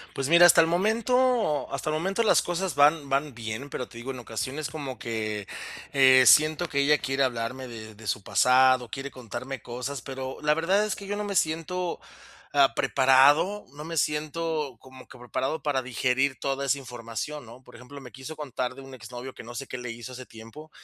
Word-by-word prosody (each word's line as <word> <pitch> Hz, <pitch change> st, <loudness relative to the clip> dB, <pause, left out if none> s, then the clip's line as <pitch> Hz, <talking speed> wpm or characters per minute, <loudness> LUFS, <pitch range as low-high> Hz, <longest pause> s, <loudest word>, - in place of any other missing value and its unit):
Pues 135 Hz, 0 st, -2 dB
mira, 170 Hz, +1 st, +8 dB
hasta 170 Hz, -, +7 dB
el 165 Hz, -, +4 dB
momento 225 Hz, -, +1 dB
hasta 155 Hz, +3 st, -2 dB
el -, -, -1 dB
momento 190 Hz, +8 st, 0 dB
las 220 Hz, -, +4 dB
cosas 175 Hz, -2 st, -3 dB
van 145 Hz, 0 st, +4 dB
van 135 Hz, 0 st, -1 dB
bien, 115 Hz, +4 st, -6 dB
pero 125 Hz, -2 st, -5 dB
te 115 Hz, -, -12 dB
digo, 130 Hz, +3 st, -5 dB
en 125 Hz, -, -8 dB
ocasiones 130 Hz, +6 st, -4 dB
como 140 Hz, -5 st, -6 dB
que, 110 Hz, -3 st, -4 dB, 0.4 s
eh, 130 Hz, -2 st, +7 dB
siento 155 Hz, +5 st, +5 dB
que 140 Hz, -, -2 dB
ella 145 Hz, +1 st, +4 dB
quiere 135 Hz, +1 st, 0 dB
hablarme 125 Hz, +1 st, -3 dB
de 110 Hz, -2 st, -10 dB
de 110 Hz, 0 st, -13 dB
su 100 Hz, -, -1 dB
pasado, 130 Hz, +2 st, +4 dB
quiere 135 Hz, +3 st, -6 dB
contarme 130 Hz, +1 st, -7 dB
cosas, 125 Hz, +2 st, -6 dB
pero 130 Hz, 0 st, -6 dB
la 150 Hz, 0 st, +2 dB
verdad 190 Hz, +6 st, +2 dB
es 210 Hz, -, -2 dB
que 200 Hz, -, -10 dB
yo 205 Hz, -, -2 dB
no 210 Hz, -, -3 dB
me 200 Hz, -1 st, -4 dB
siento, 170 Hz, +2 st, -1 dB, 0.5 s
ah, 140 Hz, -2 st, +4 dB
preparado, 145 Hz, +10 st, +4 dB
no 150 Hz, -, -9 dB
me 165 Hz, 0 st, -6 dB
siento, 150 Hz, -2 st, -1 dB
como 130 Hz, -1 st, -15 dB
que 125 Hz, -, -14 dB
preparado 130 Hz, +5 st, -3 dB
para 140 Hz, -3 st, 0 dB
digerir 130 Hz, +2 st, 0 dB
toda 140 Hz, 0 st, -2 dB
esa 140 Hz, +1 st, +1 dB
información, 125 Hz, +3 st, -6 dB
¿no? 120 Hz, +3 st, -14 dB
Por -, -, -17 dB
ejemplo, 125 Hz, +4 st, -11 dB
me 125 Hz, -2 st, -12 dB
quiso 135 Hz, +5 st, -9 dB
contar 130 Hz, -4 st, -4 dB
de 135 Hz, -, -10 dB
un 135 Hz, 0 st, -11 dB
exnovio 125 Hz, +2 st, -9 dB
que -, -, -10 dB
no 120 Hz, +1 st, -10 dB
sé 135 Hz, -, -5 dB
qué 130 Hz, -, -6 dB
le 125 Hz, -1 st, -6 dB
hizo 120 Hz, +2 st, -8 dB
hace 125 Hz, 0 st, -9 dB
tiempo, 115 Hz, +8 st, -12 dB
135 Hz, 205 wpm, -26 LUFS, 125-155 Hz, 0.5 s, mira